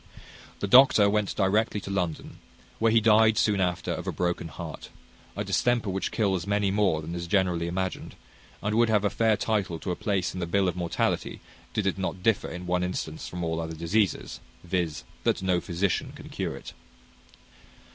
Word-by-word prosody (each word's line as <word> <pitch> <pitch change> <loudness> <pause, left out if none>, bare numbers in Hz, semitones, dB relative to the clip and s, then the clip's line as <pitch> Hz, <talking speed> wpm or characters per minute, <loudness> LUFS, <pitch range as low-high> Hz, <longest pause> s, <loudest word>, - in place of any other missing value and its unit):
The 100 - 0
doctor 125 -2 +7
went 105 -1 0
directly 105 +2 +1
to 100 - -6
London, 90 -5 -3 0.4
where 115 0 +3
he 115 - +5
died 110 0 +5
soon 105 -4 +2
after 90 -2 -1
of - - -4
a - - 0
broken 85 -1 -2
heart; - - -8 0.5
a - - -2
distemper 120 -4 +1
which 95 +1 -2
kills 95 -5 0
many 100 -1 +1
more 95 -6 +1
than 80 +2 -6
is 85 0 -4
generally 90 -3 +1
imagined, 95 +1 -3 0.5
and 105 - 0
would 115 +1 +3
have 105 -2 +2
a 105 - +2
fair 110 -2 +2
title 100 -5 -1
to 90 +3 -4
a - - -1
place 95 -2 -1
in 90 - -5
the 85 - -2
bill 95 +2 +2
of 90 - -1
mortality, 85 -2 -1 0.3
did 105 - -1
it 95 0 0
not 95 -1 -3
differ 115 -2 +2
in 90 0 -7
one 90 0 0
instance 80 -3 -4
from 90 -1 -5
all 80 0 -1
other 80 0 -5
diseases 95 +5 0 0.2
viz., 85 -7 -2 0.2
that - - +1
no 90 -2 +2
physician 90 +1 -1
can - - -11
cure - - -3
it. - - -10
95 Hz, 190 wpm, -27 LUFS, 85-105 Hz, 0.5 s, doctor